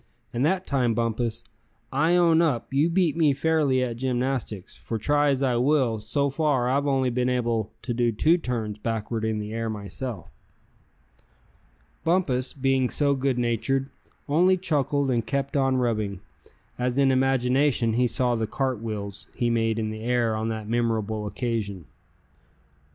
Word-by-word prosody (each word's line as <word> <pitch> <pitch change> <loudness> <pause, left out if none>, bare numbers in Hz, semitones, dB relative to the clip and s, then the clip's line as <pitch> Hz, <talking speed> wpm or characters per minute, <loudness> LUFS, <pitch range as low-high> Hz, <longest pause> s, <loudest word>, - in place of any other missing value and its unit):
And 120 +2 0
that 185 +4 +1
time, 125 -5 +1
Bumpus, 115 0 -1 0.5
I 160 +6 +3
own 170 -2 +4
up 140 -6 0
you 145 +5 +3
beat 170 -3 +2
me 155 -4 +3
fairly 145 -3 +2
at 120 -2 -3
gymnastics; 125 -5 -2
for 115 - -5
try 145 +6 +2
as 135 -1 +1
I 125 -3 +2
will, 125 -3 +2
so 140 +7 -1
far 135 -4 +1
I've 140 +3 +1
only 130 -2 +1
been 125 +1 0
able 115 -4 -1
to 120 - -2
do 120 0 +1
two 160 +10 +3
turns 110 -7 -3
backward 110 0 -3
in 110 -1 0
the 105 +1 -5
air, 115 0 -2
myself." 105 - -5 1.8
Bumpus, 155 -8 +1
being 135 -2 +1
so 145 -1 +1
good 135 -1 0
natured, 130 +3 0 0.4
only 180 +6 +4
chuckled 145 -5 0
and 120 -2 +1
kept 140 +4 -2
on 135 -2 +2
rubbing, 110 -6 -1 0.6
as 125 +1 -1
in 135 -1 +4
imagination 130 -2 +2
he 125 +2 +2
saw 125 +1 0
the 115 -2 -1
"cartwheels" 110 -6 -4
he 120 -1 0
made 115 -1 +1
in 110 -1 -2
the 110 0 -7
air 120 -1 +1
on 110 +1 -2
that 110 -2 -4
memorable 110 -2 -1
occasion. 105 - -3
125 Hz, 155 wpm, -25 LUFS, 115-140 Hz, 1.8 s, own